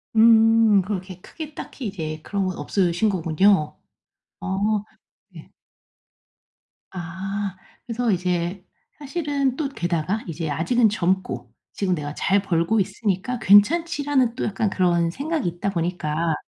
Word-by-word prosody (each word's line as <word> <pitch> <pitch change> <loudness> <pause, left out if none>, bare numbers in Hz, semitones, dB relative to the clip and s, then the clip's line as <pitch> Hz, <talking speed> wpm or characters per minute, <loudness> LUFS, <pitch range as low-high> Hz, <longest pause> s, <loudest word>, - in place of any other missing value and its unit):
음 225 -2 +6
그렇게 185 -1 -5
크게 310 - -9
딱히 255 -5 -7
이제 155 -5 -5
그런 200 -1 -2
건 185 -1 -3
없으신 185 +2 +1
거군요. 170 -1 +2 0.6
어 205 +2 0 0.5
예. - - -12 1.4
아. 190 +3 -4 0.3
그래서 235 -1 -1
이제 180 0 -1 0.3
사실은 285 -3 -1
또 290 -2 -2
게다가 175 - -2
이제 165 -1 -4
아직은 220 - +2
젊고 190 -2 -1 0.2
'지금 185 -3 0
내가 145 -2 -5
잘 195 0 +2
벌고 180 +3 +1
있으니까 200 +4 -1
괜찮지.'라는 280 - +3
또 - - -2
약간 210 0 0
그런 175 -3 +2
생각이 285 - -2
있다 175 +4 -2
보니까 170 -2 -1
195 Hz, 255 characters per minute, -23 LUFS, 175-230 Hz, 1.4 s, 음